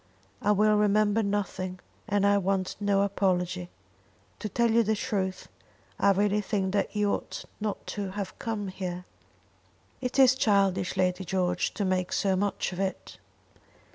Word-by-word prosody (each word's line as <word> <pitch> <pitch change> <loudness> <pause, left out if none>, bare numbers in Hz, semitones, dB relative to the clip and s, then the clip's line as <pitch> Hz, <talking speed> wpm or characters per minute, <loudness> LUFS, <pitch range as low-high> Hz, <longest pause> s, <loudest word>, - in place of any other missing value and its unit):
"I 210 - +2
will 210 +1 +4
remember 210 +1 +3
nothing, 195 -3 -2 0.3
and 205 -2 +2
I 200 0 +4
want 190 -1 -1
no 200 -1 +2
apology. 180 - 0 0.7
To 215 - -4
tell 235 +3 +2
you 230 +1 +5
the 220 0 +1
truth, 190 -3 -2 0.5
I 200 - +4
really 205 +1 +2
think 195 -2 -1
that 205 - 0
you 205 -1 +2
ought - - -5
not 210 -1 -3
to 200 -2 -3
have 195 0 -6
come 210 -4 -3
here." 180 -1 -5 1.0
"It 250 +1 -3
is 260 -2 +7
childish, 195 -6 +1
Lady 185 0 +1
George, 180 -1 -1
to 205 - -1
make 185 -1 0
so 195 -1 +2
much 200 0 -1
of 180 - -6
it." 195 -1 -4
200 Hz, 155 wpm, -28 LUFS, 185-210 Hz, 1.0 s, is